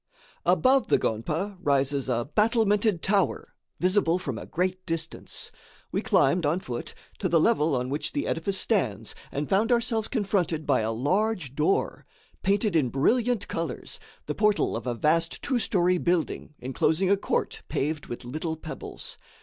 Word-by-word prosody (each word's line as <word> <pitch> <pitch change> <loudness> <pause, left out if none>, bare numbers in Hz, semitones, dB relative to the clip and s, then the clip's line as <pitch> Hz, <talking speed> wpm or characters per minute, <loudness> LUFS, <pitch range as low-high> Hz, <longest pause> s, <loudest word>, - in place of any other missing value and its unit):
Above 265 +1 +4
the - - +4
gonpa 160 - -2
rises 140 -3 +1
a 120 -1 0
battlemented 210 -3 +2
tower, 195 -2 +1 0.3
visible 185 -2 +2
from 135 -9 -4
a - - -9
great 185 +1 -1
distance. 165 -1 -5 0.4
We - - 0
climbed, 165 +6 +3
on 155 +4 +1
foot, 120 -9 -6 0.2
to 185 - 0
the 165 0 +4
level 160 -6 +3
on 125 0 -1
which 145 - -2
the 290 - -2
edifice 190 +4 -1
stands 115 - 0 0.2
and 145 +1 -2
found 210 +5 +2
ourselves 230 -2 +1
confronted 190 - 0
by - - +3
a 110 +1 -1
large 170 - 0
door, 155 +6 0 0.3
painted 200 0 +1
in 145 -6 +3
brilliant 230 - +1
colors, 165 0 -4 0.3
the - - -2
portal 210 -1 +2
of 115 +2 -5
a 120 - -1
vast 165 +6 +1
two 260 -4 +1
story 180 -4 +2
building 170 -3 -1
enclosing 155 +9 +1
a - - +6
court 200 - -2
paved 150 +1 -2
with 120 - -7
little 160 +5 -3
pebbles. 160 0 -8
170 Hz, 160 wpm, -27 LUFS, 145-205 Hz, 0.4 s, a